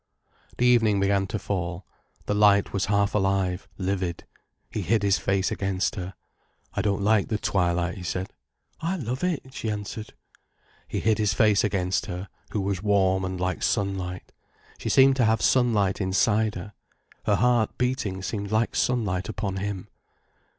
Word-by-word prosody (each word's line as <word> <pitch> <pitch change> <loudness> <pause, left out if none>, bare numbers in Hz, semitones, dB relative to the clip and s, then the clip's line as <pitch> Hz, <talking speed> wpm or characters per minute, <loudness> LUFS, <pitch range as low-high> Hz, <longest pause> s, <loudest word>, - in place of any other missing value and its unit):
The 125 - +2
evening 115 -5 +4
began 100 0 +2
to 105 - -3
fall, 90 -2 -3 0.4
the - - 0
light 105 -1 +4
was 100 -1 0
half 100 0 +1
alive, 95 -2 0
livid. 95 -3 -2 0.5
He - - -2
hid 110 -1 +1
his 100 -1 +3
face 95 -1 0
against 95 -1 -1
her. 95 -1 -6 0.6
"I - - 0
don't 100 0 0
like 105 -1 +3
the 110 - -1
twilight," 90 -3 0
he 90 - -7
said. 90 +2 -3 0.5
"I 165 +4 -1
love 130 - -4
it," 155 -7 -2
she 110 - -3
answered. 105 +1 -5 0.7
He - - -3
hid 110 0 +2
his 105 -2 +1
face 105 -1 +4
against 95 -3 0
her, 90 0 -5 0.2
who 105 - -2
was 95 -2 -2
warm 95 -2 +2
and 95 -1 -3
like 90 0 -1
sunlight. 95 -3 -2 0.5
She - - -3
seemed 135 0 +5
to 120 - +4
have 110 0 +3
sunlight 110 -7 +2
inside 105 +3 +2
her. 95 +3 -7 0.5
Her - - +4
heart 120 -2 +2
beating 125 -7 -1
seemed 100 0 -4
like 110 +1 +1
sunlight 105 -7 0
upon 100 -3 -3
him. 100 0 -4
100 Hz, 165 wpm, -26 LUFS, 95-110 Hz, 0.7 s, seemed